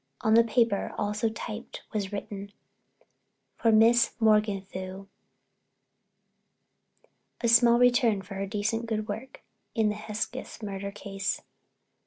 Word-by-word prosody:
On 220 - +2
the 230 +1 +7
paper, 230 -2 +1
also 210 +2 0
typed, 220 +1 -7
was 205 -2 -2
written: 200 0 -6 1.0
For 225 - +2
Miss 230 +2 +5
Morganthau—A 195 -3 0 2.4
small 235 +1 +6
return 240 -4 +3
for 195 +2 -10
her 195 0 -4
recent 225 +2 -1
good 215 -1 -2
work 225 +6 -7 0.3
in 220 -2 +3
the 210 - -2
Hesketh 215 +1 -5
Murder 200 -1 -4
Case. 195 -1 -4
215 Hz, 110 wpm, -28 LUFS, 200-230 Hz, 2.4 s, the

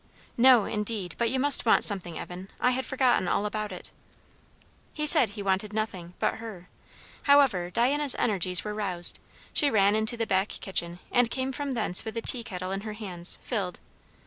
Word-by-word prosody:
"No 245 -3 +5
indeed! 210 -4 -3
But 235 -1 +1
you 260 - -2
must 285 +1 +4
want 230 - +3
something, 175 -5 +2
Evan! 180 +2 -9
I 250 - +2
had 260 +1 -3
forgotten 255 -7 0
all 200 - -1
about 210 0 -4
it." 180 - -10 1.0
He 300 - -3
said 300 -6 +6
he 205 0 -8
wanted 195 +2 -2
nothing, 185 -5 -5
but - - -2
her; 215 -6 -11 0.6
however, 270 -12 +3
Diana's 270 +7 +1
energies 185 -5 +3
were 210 - -5
roused. 185 -5 +2 0.3
She 290 - +2
ran 200 -3 +2
into 220 +2 -1
the 230 - -2
back 195 -1 0
kitchen, 175 -4 -4
and 245 -1 +2
came 260 +2 -3
from 280 0 -5
thence 220 -6 +1
with 220 0 -8
the 230 - -3
tea 245 -2 +6
kettle 185 -3 -7
in 195 +1 -4
her 215 0 -7
hands, 185 -5 -5
filled. 195 -7 -4
215 Hz, 185 wpm, -26 LUFS, 190-245 Hz, 1.0 s, said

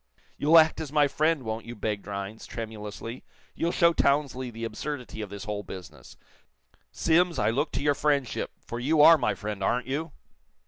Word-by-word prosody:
"You'll 155 +3 +5
act 160 0 +5
as 150 -3 -6
my 150 -1 +4
friend, 155 0 +1
won't 110 0 -4
you?" 120 - -7
begged 105 -2 -3
Rhinds, 100 +2 -6
tremulously. 110 +1 -7 0.3
"You'll 170 - -1
show 170 -1 +4
Townsley 140 -4 +1
the 115 0 -8
absurdity 120 +1 -5
of 105 - -5
this 100 0 -7
whole 105 -1 -3
business. 95 -2 -11 0.7
Simms, 170 0 +2
I 105 -1 +2
look 140 +7 -1
to - - -2
your 145 0 +3
friendship, 140 -4 0 0.2
for 120 - -5
you 150 +4 +3
are 165 0 +8
my - - 0
friend, 105 -2 -5
aren't 125 +5 +1
you?" 150 +5 -3
125 Hz, 180 wpm, -27 LUFS, 110-150 Hz, 0.7 s, are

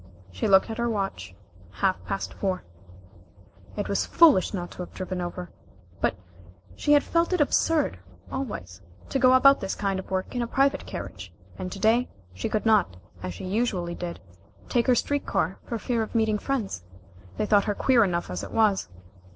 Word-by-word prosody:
She 90 - -2
looked 195 +3 +5
at 225 - -6
her 235 0 +1
watch. 195 - -3 0.4
Half 190 -1 0
past 195 - -3
four. 190 -2 -2 1.1
It 205 - -2
was 200 - 0
foolish 310 - +5
not 175 -3 -4
to - - -13
have 180 - -7
driven 185 -1 -4
over, 175 0 -5 0.5
but - - +1 0.6
she 295 - +2
had 290 - +5
felt 335 +2 +1
it 365 - +1
absurd, 295 - +2 0.3
always, 100 - -5 0.3
to 270 - 0
go 255 0 +6
about 275 +2 +6
this 195 -1 -3
kind 195 -2 -1
of 190 - -9
work 190 0 -2
in 245 - -1
a 235 - -1
private 275 +3 +1
carriage, - - -7 0.2
and 185 - -5
to 200 - -6
day 225 +5 +3 0.2
she 90 - -3
could 215 - -1
not, 210 - +3 0.2
as 90 -1 -5
she - - -7
usually 185 -4 -1
did, 170 0 -6 0.5
take 240 0 +1
a 250 - +6
street 285 +4 -1
car 175 +3 -1
for 235 - -2
fear 230 +1 -1
of 220 - -5
meeting 220 -2 +2
friends. 230 - -2 0.6
They - - 0
thought 205 -1 +4
her 205 - -1
queer 245 0 +4
enough 175 - -1
as 90 0 -3
it - - -7
was. 210 - +2
205 Hz, 190 wpm, -26 LUFS, 180-245 Hz, 1.1 s, go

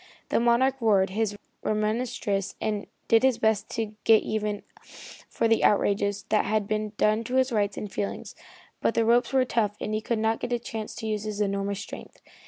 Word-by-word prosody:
The - - +2
Monarch 240 +3 +3
roared 195 -4 +3
his 210 0 -1 0.2
remonstrances 215 -2 -1
and 210 -2 -2 0.2
did 225 0 +5
his 260 -3 +3
best 220 -1 +1
to 220 -2 -2
get 225 -1 +5
even 210 -1 -2 0.7
for 230 - +1
the 225 0 +3
outrages 200 0 +2
that 215 - +2
had 215 -1 0
been 215 0 -2
done 215 +2 +2
to 250 - -3
his 260 0 +3
rights 205 -3 0
and 210 - -4
his 195 - -17
feelings, 200 - -4 0.5
but - - +1
the 230 - +3
ropes 240 +2 +3
were 260 -1 +3
tough 215 -4 0
and 215 - -3
he 215 - 0
could 235 +1 -1
not 220 +1 +1
get 245 - -3
a - - +2
chance 225 -2 -6
to - - -6
use 215 -1 -2
his 210 -1 -4
enormous 200 -1 -1
strength. - - -10
215 Hz, 200 wpm, -26 LUFS, 205-230 Hz, 0.7 s, did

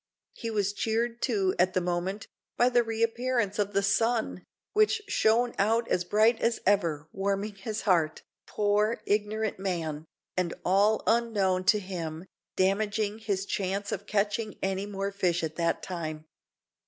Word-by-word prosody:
He 230 - -5
was 205 -2 0
cheered, 230 +2 -1
too, 195 -6 +1
at 185 +1 +3
the - - +4
moment, 180 +3 -2 0.3
by 245 - +5
the 245 -1 +4
re 225 -1 -1
appearance 230 -3 0
of 205 0 0
the 200 +1 +2
sun, 225 +3 +1 0.3
which 430 +1 +3
shone 235 +2 +2
out 225 +4 +2
as 180 - +1
bright 220 +5 +3
as 230 0 +1
ever, 165 -7 +1
warming 200 +2 -1
his 210 +2 -5
heart, 165 -6 +1 0.2
(poor, 210 +2 +1
ignorant 210 0 0
man!) 165 -5 -3 0.3
and, 180 -2 -1
all 200 +4 +3
unknown 205 -6 +2
to 210 +2 +5
him, 175 -4 -5 0.3
damaging 205 +2 +1
his 200 -3 -2
chance 200 +1 -2
of 200 +1 -4
catching 210 +1 -1
any 195 +1 -1
more 200 0 -3
fish 180 -4 0
at 160 -1 -3
that 170 -1 0
time. 155 -4 -5
205 Hz, 155 wpm, -28 LUFS, 185-220 Hz, 0.3 s, by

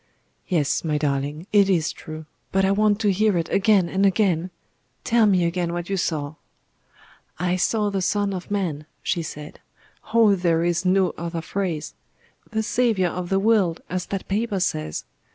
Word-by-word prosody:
"Yes, 155 -7 +1
my 155 -2 0
darling; 145 +2 -2
it 200 -2 +5
is 170 -3 +2
true. 155 0 -9 0.3
But 195 0 +2
I 190 - +2
want 210 +1 +2
to 205 -2 +3
hear 205 0 +2
it 165 -1 -1
again 200 -3 +3
and 190 +3 0
again. 185 -3 +2 0.5
Tell 230 -2 +3
me 185 -4 +3
again 170 0 -1
what 175 +2 -4
you - - +1
saw." 155 -5 -2 1.0
"I 180 +1 0
saw 210 +2 +1
the 195 -1 -1
Son 200 +2 0
of 185 -1 -6
Man," 170 -7 -2 0.2
she 175 - 0
said. 150 -2 -8 0.5
"Oh! 225 -3 +5
there 170 -3 +1
is 175 +1 0
no 185 0 +3
other 170 0 -3
phrase. 170 -5 -3 0.6
The 220 0 -1
Saviour 220 -7 +1
of 180 -1 -5
the 195 - +2
world, 195 -5 +2
as 180 0 -2
that 195 -1 -4
paper 205 0 -1
says. 75 - -2
185 Hz, 170 wpm, -23 LUFS, 165-200 Hz, 1.0 s, it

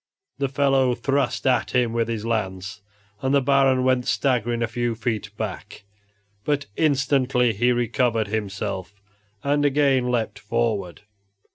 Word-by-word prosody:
The 140 -1 0
fellow 135 -2 +2
thrust 135 +4 -1
at 125 -1 +1
him 120 -2 +2
with 115 -1 0
his 115 -2 -3
lance, 100 -3 -3 0.4
and 135 +1 +1
the - - +6
Baron 135 -1 +3
went 130 -1 +1
staggering 120 -3 +1
a - - 0
few 120 0 -2
feet 110 -2 -3
back, 105 -1 -6 0.6
but 145 -1 0
instantly 135 -5 +2
he 120 +5 +2
recovered 120 -2 0
himself 100 -2 -4 0.4
and 145 +1 +1
again 135 -3 +2
leaped 120 -3 -1
forward. 105 -5 -2
120 Hz, 135 wpm, -23 LUFS, 110-135 Hz, 0.6 s, the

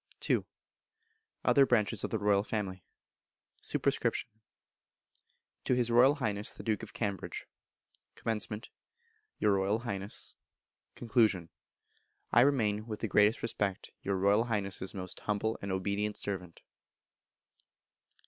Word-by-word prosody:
ii. - - +5 1.1
Other 140 - +6
branches 115 -4 +2
of - - -1
the 110 - 0
Royal 100 -1 +3
Family. 100 -4 -3 0.8
Sup. - - -2 1.8
To - - +2
His 120 -1 +1
Royal 125 +5 +6
Highness 105 -7 -1
the - - -9
Duke 110 -3 0
of - - -8
Cambridge. 100 -4 -3 0.7
Comm. 110 0 -3 0.7
Your 105 - +3
Royal 100 +2 +2
Highness. 100 -4 -4 0.6
Con. 110 -7 +2 0.8
I 120 - +7
remain, 110 -6 +2
with 110 -2 -5
the 115 - 0
greatest 105 +2 +4
respect, 105 -4 -2
your 100 - -1
Royal 100 +4 +3
Highness's 100 -4 -3
most 95 -2 -5
humble 105 +1 -1
and 100 - -3
obedient 100 +2 -1
servant. 90 -4 -5
105 Hz, 115 wpm, -32 LUFS, 100-115 Hz, 1.8 s, I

